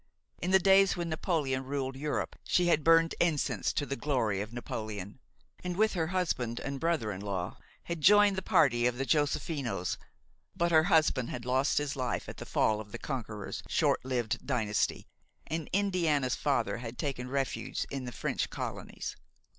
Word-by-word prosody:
In 180 Hz, -, -1 dB
the 190 Hz, -, +7 dB
days 195 Hz, 0 st, +5 dB
when 170 Hz, -1 st, -2 dB
Napoleon 155 Hz, -5 st, 0 dB
ruled 135 Hz, 0 st, -3 dB
Europe 145 Hz, +2 st, -2 dB
she 180 Hz, -, +2 dB
had 155 Hz, -3 st, +3 dB
burned 165 Hz, +1 st, +5 dB
incense 165 Hz, -4 st, +1 dB
to 145 Hz, -, 0 dB
the 140 Hz, -, -3 dB
glory 115 Hz, -7 st, 0 dB
of 105 Hz, +2 st, -6 dB
Napoleon, 110 Hz, -3 st, -6 dB, 0.4 s
and 180 Hz, -1 st, -3 dB
with 215 Hz, +1 st, +3 dB
her 165 Hz, -4 st, 0 dB
husband 160 Hz, -10 st, -1 dB
and 135 Hz, -1 st, -4 dB
brother 160 Hz, -10 st, 0 dB
in 95 Hz, -1 st, -6 dB
law 95 Hz, -3 st, -4 dB, 0.2 s
had 170 Hz, -2 st, -4 dB
joined 205 Hz, +3 st, +6 dB
the 190 Hz, -, -2 dB
party 140 Hz, -, +3 dB
of 125 Hz, 0 st, -1 dB
the 135 Hz, -, -1 dB
Joséphinos; 140 Hz, -, 0 dB, 0.6 s
but 170 Hz, 0 st, +1 dB
her 160 Hz, -1 st, +5 dB
husband 155 Hz, -8 st, +3 dB
had 120 Hz, -1 st, -5 dB
lost 130 Hz, +3 st, +2 dB
his 145 Hz, -1 st, 0 dB
life 125 Hz, -3 st, -2 dB
at -, -, -8 dB
the -, -, -8 dB
fall 110 Hz, 0 st, +2 dB
of 105 Hz, -1 st, -12 dB
the -, -, -5 dB
conqueror's 110 Hz, -7 st, -5 dB
short -, -, +2 dB
lived 125 Hz, -4 st, -2 dB
dynasty, 110 Hz, -6 st, 0 dB, 0.4 s
and 160 Hz, -1 st, -4 dB
Indiana's 170 Hz, -10 st, +1 dB
father 120 Hz, -8 st, 0 dB
had 120 Hz, 0 st, -7 dB
taken 130 Hz, -3 st, -3 dB
refuge 135 Hz, -1 st, -2 dB
in 135 Hz, -2 st, -4 dB
the 125 Hz, -, -5 dB
French -, -, -2 dB
colonies. -, -, -5 dB
140 Hz, 175 wpm, -31 LUFS, 120-165 Hz, 0.6 s, the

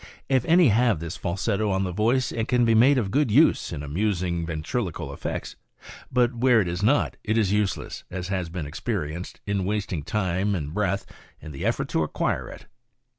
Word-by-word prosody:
If 130 Hz, -3 st, +3 dB
any 170 Hz, -3 st, +5 dB
have 115 Hz, -4 st, +3 dB
this 85 Hz, 0 st, -5 dB
falsetto 100 Hz, +4 st, -1 dB
on 95 Hz, 0 st, +1 dB
the 95 Hz, -, -2 dB
voice 115 Hz, +7 st, +1 dB
it 115 Hz, -1 st, -2 dB
can 125 Hz, -1 st, +3 dB
be 115 Hz, -, +4 dB
made 130 Hz, +5 st, +5 dB
of 105 Hz, -6 st, -1 dB
good 145 Hz, -2 st, +2 dB
use 140 Hz, +10 st, +4 dB
iu 75 Hz, -3 st, -5 dB
amusing 85 Hz, +1 st, -1 dB
ventriloquial 85 Hz, -, -3 dB
effects; -, -, -5 dB, 0.6 s
but 125 Hz, 0 st, +2 dB
where 120 Hz, 0 st, +4 dB
it 95 Hz, -, +1 dB
is 85 Hz, +1 st, -3 dB
not, 135 Hz, +8 st, +2 dB
it 110 Hz, +1 st, 0 dB
is 105 Hz, -4 st, +2 dB
useless, 105 Hz, -2 st, -1 dB
as 90 Hz, 0 st, -5 dB
has 95 Hz, -3 st, -2 dB
been 85 Hz, -2 st, -5 dB
experienced, 75 Hz, +3 st, -4 dB
in 100 Hz, -2 st, -1 dB
wasting 100 Hz, -4 st, -2 dB
time 95 Hz, +3 st, -1 dB
and 75 Hz, -3 st, -4 dB
breath 100 Hz, 0 st, -1 dB, 0.3 s
in 75 Hz, -, -9 dB
the 70 Hz, -, -7 dB
effort -, -, 0 dB
to -, -, +1 dB
acquire 75 Hz, -, -1 dB
it. -, -, -11 dB
100 Hz, 190 wpm, -25 LUFS, 85-115 Hz, 0.6 s, any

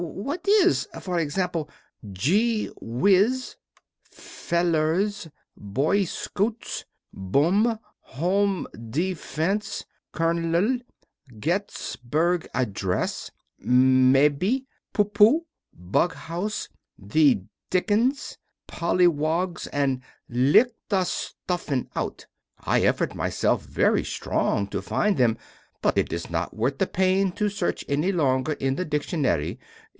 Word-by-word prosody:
What 275 Hz, -, -5 dB
is, 395 Hz, -2 st, +4 dB
for 180 Hz, -2 st, -2 dB
example, 165 Hz, 0 st, -2 dB, 0.4 s
gee 210 Hz, -, +1 dB
whiz, 200 Hz, -, +2 dB, 0.6 s
felers, 170 Hz, +3 st, -1 dB, 0.3 s
boy 140 Hz, -, 0 dB
scouts, 215 Hz, +6 st, -3 dB, 0.3 s
bum, 175 Hz, -, +2 dB, 0.2 s
home 190 Hz, +6 st, 0 dB, 0.2 s
defence, 180 Hz, -, -2 dB, 0.3 s
kernel, 170 Hz, +8 st, +1 dB, 0.6 s
getysberg 170 Hz, -, -1 dB
adress, 100 Hz, -7 st, -1 dB, 0.3 s
mebbe, 135 Hz, -, +4 dB, 0.3 s
pooh 205 Hz, -, +2 dB
pooh, 210 Hz, +11 st, +4 dB, 0.3 s
bug 100 Hz, -, 0 dB
house, 180 Hz, +6 st, -4 dB, 0.3 s
the 120 Hz, +2 st, +3 dB, 0.3 s
dickens, 225 Hz, +9 st, 0 dB, 0.3 s
pollywogs, 170 Hz, 0 st, +1 dB
and 135 Hz, -3 st, 0 dB, 0.3 s
lick 135 Hz, -, +4 dB, 0.2 s
the 195 Hz, -3 st, +2 dB
stuffin 175 Hz, -6 st, -3 dB
out? -, -, -4 dB, 0.3 s
I -, -, +1 dB
effort -, -, +1 dB
myself -, -, 0 dB
very -, -, +1 dB
strong 100 Hz, -, -1 dB
to -, -, -3 dB
find 210 Hz, -2 st, 0 dB
them, 115 Hz, -3 st, +3 dB, 0.5 s
but -, -, +2 dB
it -, -, +1 dB
is 85 Hz, 0 st, -3 dB
not 85 Hz, 0 st, -2 dB
worth 130 Hz, +6 st, -1 dB
the 190 Hz, -, +2 dB
pain 190 Hz, +1 st, +2 dB
to 210 Hz, +2 st, 0 dB
search 200 Hz, -3 st, -2 dB
any 150 Hz, +7 st, +1 dB
longer 140 Hz, -4 st, +1 dB
in 135 Hz, -2 st, -1 dB
the 185 Hz, -, -2 dB
dictionary. 145 Hz, -, -1 dB
170 Hz, 100 wpm, -25 LUFS, 135-200 Hz, 0.6 s, is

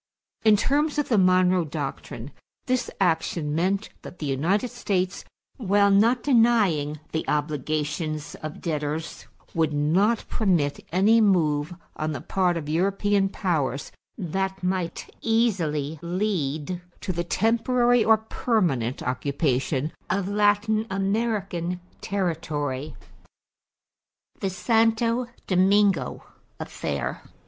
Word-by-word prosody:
In 215 Hz, -2 st, +6 dB
terms 295 Hz, +7 st, +1 dB
of 295 Hz, -, 0 dB
the 225 Hz, -, +3 dB
Monroe 185 Hz, -1 st, +4 dB
Doctrine 145 Hz, -4 st, -6 dB, 0.3 s
this 255 Hz, -1 st, 0 dB
action 160 Hz, -4 st, 0 dB
meant 190 Hz, +6 st, 0 dB
that 180 Hz, -, -10 dB
the 155 Hz, -, -5 dB
United 170 Hz, -, 0 dB
States, 190 Hz, -6 st, -1 dB, 0.3 s
while 200 Hz, -4 st, +3 dB
not 230 Hz, +5 st, +4 dB
denying 210 Hz, -, +3 dB
the 160 Hz, -, -1 dB
obligations 150 Hz, +1 st, -2 dB
of 155 Hz, 0 st, -7 dB
debtors, 155 Hz, -1 st, -3 dB, 0.3 s
would 160 Hz, -2 st, +1 dB
not 180 Hz, +10 st, +2 dB
permit 170 Hz, -10 st, 0 dB
any 210 Hz, +6 st, +4 dB
move 165 Hz, -5 st, +2 dB, 0.2 s
on 155 Hz, 0 st, -2 dB
the 140 Hz, -, -4 dB
part 180 Hz, +4 st, 0 dB
of 155 Hz, -3 st, -5 dB
European 195 Hz, +4 st, +1 dB
powers 155 Hz, -9 st, -1 dB, 0.3 s
that 190 Hz, 0 st, -3 dB
might 180 Hz, -2 st, -2 dB
easily 165 Hz, -10 st, 0 dB
lead 175 Hz, -3 st, -2 dB, 0.2 s
to 185 Hz, -, -3 dB
the 170 Hz, 0 st, -1 dB
temporary 235 Hz, +5 st, +2 dB
or 220 Hz, 0 st, +5 dB
permanent 180 Hz, -, -1 dB
occupation 140 Hz, +2 st, -1 dB, 0.2 s
of 190 Hz, 0 st, 0 dB
Latin 210 Hz, +2 st, +2 dB
American 195 Hz, -3 st, -1 dB, 0.2 s
territory. 155 Hz, -7 st, -2 dB, 1.4 s
=The 195 Hz, -, -1 dB
Santo 230 Hz, +5 st, +2 dB, 0.2 s
Domingo 195 Hz, +2 st, +2 dB, 0.4 s
Affair. -, -, -4 dB
185 Hz, 105 wpm, -25 LUFS, 155-210 Hz, 1.4 s, In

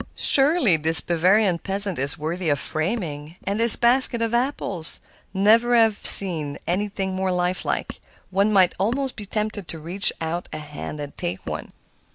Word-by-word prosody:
"Surely, 275 Hz, -, +2 dB
this 160 Hz, +1 st, +3 dB
Bavarian 180 Hz, +2 st, 0 dB
peasant 195 Hz, -2 st, 0 dB
is 135 Hz, 0 st, +4 dB
worthy 165 Hz, +3 st, -4 dB
of 145 Hz, -, 0 dB
framing; 155 Hz, -, -5 dB
and 200 Hz, +2 st, -3 dB
this 230 Hz, -1 st, +8 dB
basket 240 Hz, 0 st, +3 dB
of 230 Hz, 0 st, -3 dB
apples! 235 Hz, -, -3 dB, 0.3 s
never 225 Hz, +5 st, +2 dB
have 225 Hz, -3 st, +2 dB
I -, -, -2 dB
seen 160 Hz, -7 st, +6 dB
anything 190 Hz, +1 st, -4 dB
more 190 Hz, 0 st, -2 dB
lifelike. 180 Hz, 0 st, -4 dB, 0.3 s
One 200 Hz, +3 st, 0 dB
might 190 Hz, -4 st, +2 dB
almost 255 Hz, +7 st, -2 dB
be 210 Hz, -3 st, -10 dB
tempted 210 Hz, -2 st, -5 dB
to 165 Hz, -, -8 dB
reach 175 Hz, +6 st, -1 dB
out 165 Hz, +2 st, -5 dB
a -, -, -7 dB
hand 150 Hz, 0 st, -9 dB
and 145 Hz, -1 st, -9 dB
take 90 Hz, +2 st, -6 dB
one." -, -, -7 dB
190 Hz, 165 wpm, -21 LUFS, 160-220 Hz, 0.3 s, this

